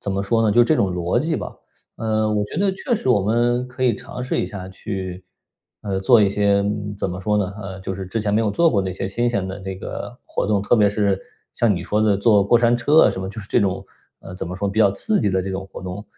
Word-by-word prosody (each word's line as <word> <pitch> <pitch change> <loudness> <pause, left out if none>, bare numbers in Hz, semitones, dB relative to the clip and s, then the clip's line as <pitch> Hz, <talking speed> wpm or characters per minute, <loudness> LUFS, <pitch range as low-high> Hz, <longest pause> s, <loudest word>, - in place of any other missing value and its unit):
怎 100 - -4
么 100 0 -1
说 115 +3 +1
呢？ 110 - +3
就 120 - +5
是 - - +7
这 155 +6 +2
种 95 -7 +1
逻 90 +5 0
辑 160 +4 -1
吧。 - - -6 0.4
呃， 110 -1 0
我 105 -1 +1
觉 - - -8
得 200 -1 +2
确 240 +6 -2
实 130 - -3
我 120 -5 +4
们 120 +4 +1
可 130 +1 -7
以 120 -4 +3
尝 125 - -8
试 125 - -1
一 - - -2
下 95 -2 -7
去， 95 -1 -6 0.6
呃， 100 -2 -2
做 110 +3 +5
一 100 - +4
些， 100 0 +2
嗯， 105 0 -3
怎 95 - -2
么 90 +1 -5
说 105 +2 0
呢？ 100 -1 -1
呃， 95 -1 -7
就 95 - -4
是 95 -1 -6
之 110 +4 -3
前 105 -1 -1
没 110 - +3
有 110 -2 +1
做 165 +9 +3
过 100 -5 +2
那 95 -1 -3
些 95 +1 -4
新 120 +5 0
鲜 100 -5 -1
的 95 +2 -6
这 95 0 -5
个 115 +4 -7
活 - - -2
动， 100 -1 +1
特 120 - +3
别 105 -2 +4
是 100 -2 0 0.3
像 110 -4 +2
你 - - -4
说 105 - 0
的 105 -2 +3
坐 100 -1 +4
过 120 +4 +4
山 120 0 +3
车 145 +6 +4
啊 - - +5
什 95 - -5
么， 95 - -4
就 110 +3 -7
是 100 - -12
这 - - +2
种 95 -2 -1 0.4
呃， 95 - -10
怎 90 - -5
么 90 - -5
说， 100 +2 -2
比 100 - -3
较 100 -3 +5
刺 210 - 0
激 - - +1
的 95 0 0
这 95 - -4
种 95 0 -4
活 - - -8
动。 95 +3 -6
105 Hz, 310 characters per minute, -21 LUFS, 95-115 Hz, 0.6 s, 是